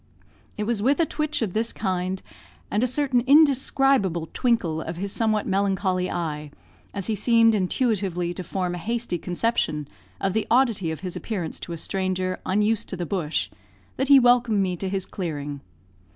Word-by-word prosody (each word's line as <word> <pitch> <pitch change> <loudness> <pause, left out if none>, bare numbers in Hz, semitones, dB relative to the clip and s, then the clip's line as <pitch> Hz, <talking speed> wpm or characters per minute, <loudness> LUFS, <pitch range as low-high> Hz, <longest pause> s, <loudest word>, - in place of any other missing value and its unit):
It 210 - -1
was 220 -1 -1
with 275 +8 +2
a 335 - +4
twitch 305 -5 -2
of 195 -5 -3
this 225 +2 0
kind, 185 -1 -2 0.5
and 210 - +1
a - - +3
certain 260 -1 +1
indescribable 270 - +3
twinkle 185 -11 +1
of 165 +1 -6
his 195 +2 -3
somewhat 215 -1 +1
melancholy 190 -1 0
eye, 150 -3 -3 0.4
as 200 -2 -4
he 220 - 0
seemed 230 +1 +4
intuitively 190 -4 0
to 180 - -5
form 180 0 -2
a 175 - -4
hasty 230 -2 -2
conception 175 -6 -1 0.3
of 195 -1 0
the 220 0 -1
oddity 230 -8 +2
of 160 - -5
his 185 -2 -5
appearance 180 -8 -4
to - - -7
a - - -5
stranger 185 +1 -2
unused 210 +3 +1
to 190 - -5
the 175 - -3
bush, 170 -3 -1 0.5
that 265 - 0
he 280 -1 +8
welcomed 245 -3 +4
me 185 -2 0
to 190 +2 -4
his 190 -1 -2
clearing. 145 -6 -5
195 Hz, 175 wpm, -24 LUFS, 180-230 Hz, 0.5 s, he